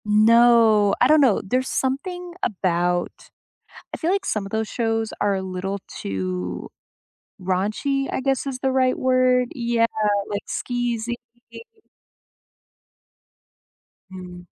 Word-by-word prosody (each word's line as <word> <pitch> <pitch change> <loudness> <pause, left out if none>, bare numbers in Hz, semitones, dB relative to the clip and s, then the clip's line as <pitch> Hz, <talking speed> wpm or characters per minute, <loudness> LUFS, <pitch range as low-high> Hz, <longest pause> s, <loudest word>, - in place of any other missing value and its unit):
No, 220 -1 +5
I 250 - +5
don't 305 +1 +5
know, 250 -8 +3
there's 255 +6 -1
something 350 +7 -3
about 175 -3 0 0.8
I - - -3
feel 335 - 0
like 390 0 0
some 210 - -1
of 195 - -9
those 220 0 -1
shows 225 -1 -1
are 200 -1 +1
a 190 - -2
little 190 +1 -4
too 90 -2 -4 0.7
raunchy, 215 +10 -1
I - - -1
guess 270 0 0
is 260 -2 -4
the 265 0 0
right 260 -1 +2
word? 255 -1 +2
Yeah, 235 -2 +1 0.4
like, 205 0 -3
skeezy. 240 -1 -2 3.0
Mm. 180 -1 -10
230 Hz, 120 wpm, -22 LUFS, 195-255 Hz, 3.0 s, No